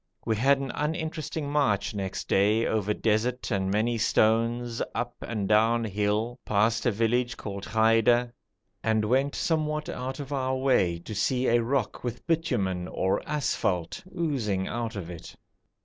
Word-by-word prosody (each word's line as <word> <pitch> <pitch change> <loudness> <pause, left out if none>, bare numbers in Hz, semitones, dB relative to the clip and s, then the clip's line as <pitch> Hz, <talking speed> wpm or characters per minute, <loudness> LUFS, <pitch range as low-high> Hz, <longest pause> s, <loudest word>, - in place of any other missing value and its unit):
We 110 - +1
had 135 +6 +4
an 135 -2 -4
uninteresting 155 -1 -3
march 135 -9 +1
next 95 -2 -4
day, 105 +4 +3
over 105 -2 0
desert 115 +4 0
and 95 -2 0
many 110 +4 +1
stones, 115 +2 +2
up 120 0 -2
and 105 -4 -3
down 115 +3 +3
hill, 105 +3 -1
past 110 +3 +1
a - - +4
village 115 +3 0
called 100 -2 -6
Ghaida, 115 +2 +3 0.5
and 110 -1 +2
went 135 +5 +1
somewhat 155 -2 -1
out 130 +3 -4
of 145 0 -5
our 130 -1 0
way 125 -10 +2
to 85 +6 -8
see 125 +5 +1
a 120 -1 +4
rock 120 -1 -1
with 120 -1 -5
bitumen 110 - 0
or 95 +1 0
asphalte 115 - -1 0.2
oozing 115 - -1
out 120 -1 -3
of 90 -3 -5
it. 85 - -10
115 Hz, 150 wpm, -27 LUFS, 105-130 Hz, 0.5 s, had